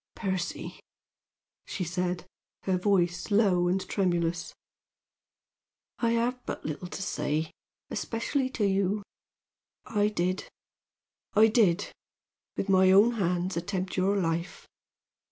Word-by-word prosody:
"Percy," 190 -4 -3 0.9
she 185 - -3
said, 180 +1 -2 0.4
her 190 - +1
voice 180 -2 +1
low 195 -4 +3
and 185 +1 0
tremulous. 175 -3 0 1.5
"I 230 -1 +2
have 245 +2 0
but - - -5
little 155 +4 -4
to 195 - -5
say, 150 -1 -1 0.4
especially 255 +3 -1
to 220 -5 -1
you. 195 +1 +1 0.8
I 210 -3 +1
did 185 -2 -1 0.9
I 220 +2 +7
did, 210 -7 +3 0.7
with - - -1
my 190 -1 +5
own 200 +5 +7
hands 180 -4 -1
attempt 185 +2 -3
your 195 +2 +2
life! 170 -1 -2
190 Hz, 110 wpm, -28 LUFS, 175-205 Hz, 1.5 s, I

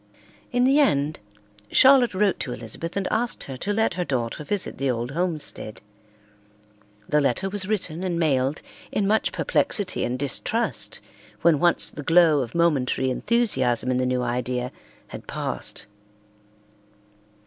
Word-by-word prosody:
In 245 -1 +2
the 270 +3 +4
end, 150 - +2 0.5
Charlotte 260 -5 +5
wrote 200 -1 +2
to 125 - -3
Elizabeth 165 - -6
and 195 - -1
asked 235 +2 -1
her 135 - -7
to 200 - -3
let 220 +2 +1
her 180 - -2
daughter 130 -1 -3
visit 200 +5 -3
the 135 0 0
old 120 +1 -2
homestead. 155 -9 -3 1.3
The 150 - +2
letter 145 +8 0
was 195 -2 0
written 185 -5 -2
and 180 -2 -1
mailed 140 -2 +1 0.3
in 205 - 0
much 215 +2 +2
perplexity 200 -5 0
and 125 +1 -1
distrust 140 0 -1 0.4
when 165 -4 +4
once 175 +2 +3
the - - -7
glow 165 -1 +5
of 120 +2 -6
momentary 135 -6 +1
enthusiasm 130 - +1
in 125 - +1
the 130 0 0
new 125 0 0
idea 125 +1 -2 0.4
had - - -9
passed. - - -4
155 Hz, 145 wpm, -24 LUFS, 130-195 Hz, 1.3 s, Charlotte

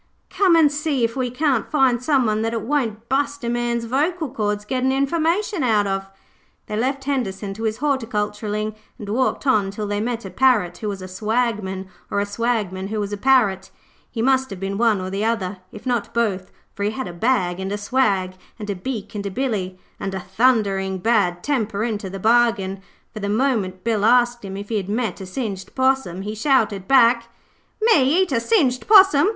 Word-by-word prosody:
'Come 375 -4 +4
an' 310 -3 +5
see 295 -3 -1
if 230 0 0
we 255 -2 -1
can't 260 -1 0
find 265 -5 +2
someone 245 -7 +2
that 225 +1 -1
it 225 -2 -2
won't 230 -4 -2
bust 285 +1 -1
a 235 - -1
man's 240 -1 -1
vocal 305 +5 -1
cords 210 -4 -2
gettin' 260 +2 0
information 330 - 0
out 220 -5 +2
of.' 195 0 -2 0.6
They 210 - -5
left 265 +5 -1
Henderson 215 -8 -2
to 225 +3 -5
his 220 0 -1
horticulturing 215 -5 -2 0.2
and 205 - -8
walked 255 +5 0
on 215 -8 +3
till 210 +2 -5
they 205 0 -2
met 235 -1 -3
a 190 - -7
Parrot 215 -6 +2
who 215 - -3
was 195 -2 -5
a - - -6
Swagman, 205 -1 -2 0.2
or 200 - 0
a 200 - 0
Swagman 205 -3 -2
who 215 +1 -3
was 205 0 -3
a - - -2
Parrot. 205 -6 +2 0.4
He 225 -2 -3
must 265 0 +2
have 195 -3 -7
been 195 +1 -3
one 225 -4 +3
or 185 0 -5
the 200 +2 -2
other, 205 -4 -1
if 215 - -11
not 240 -4 -2
both, 200 -6 0 0.2
for 205 - -9
he 205 - +1
had 255 +4 -4
a 175 - -7
bag 180 -3 0
and 190 +1 -4
a 205 - -1
swag, 205 -4 +1 0.2
and 210 -2 -4
a - - -3
beak, 215 +2 -5
and 200 -1 -4
a - - -2
billy, 195 -5 -2 0.2
and 195 -1 -4
a - - -2
thundering 195 -2 +1
bad 185 -4 +1
temper 220 -7 -1
into 215 -4 -3
the 195 - -6
bargain, 220 -3 +2 0.3
for 215 - -6
the 200 -1 -3
moment 210 -6 0
Bill 220 -3 0
asked 240 +1 +3
him 195 -1 -6
if 205 +1 -7
he 225 - 0
had 195 -1 -4
met 215 -3 -2
a 190 - -7
singed 195 -2 -5
possum 260 -9 +1
he 210 +1 -4
shouted 215 -5 +1
back 235 -3 +4 0.5
'Me 350 - +4
eat 370 - -5
a 245 - +2
singed 255 - +1
possum! 390 -5 +7
225 Hz, 200 wpm, -21 LUFS, 200-260 Hz, 0.6 s, possum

